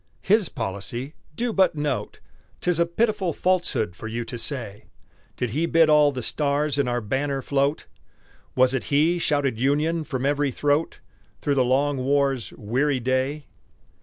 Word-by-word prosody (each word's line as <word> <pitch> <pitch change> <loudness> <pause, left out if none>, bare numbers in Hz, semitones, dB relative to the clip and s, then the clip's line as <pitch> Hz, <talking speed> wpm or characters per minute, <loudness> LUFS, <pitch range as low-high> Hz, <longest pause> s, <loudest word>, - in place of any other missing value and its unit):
"His 205 -2 +3
policy" 120 +5 -4 0.2
do 240 +3 -1
but 190 -4 +3
note! 145 -2 -3 0.4
'Tis 180 -2 0
a 170 - +3
pitiful 190 -1 0
falsehood 175 - 0
for 110 - -7
you 115 +1 -4
to 120 - -6
say. 115 -5 -5 0.5
Did 125 -3 -2
he 160 +7 0
bid 165 -2 +4
all 150 -1 +5
the 130 -3 -5
stars 145 +2 0
in 140 - +2
our 120 0 -1
banner 135 +5 -2
float? 140 +1 0 0.7
Was 130 0 +4
it 130 - -2
he 160 +5 +2
shouted 140 -7 0
Union 150 +5 +1
from 130 -3 -3
every 145 0 +1
throat 145 +4 0 0.4
Through 145 - 0
the 135 -2 +3
long 135 +3 +1
war's 135 -1 0
weary 130 +6 0
day? 130 +4 -1
140 Hz, 160 wpm, -24 LUFS, 130-155 Hz, 0.7 s, all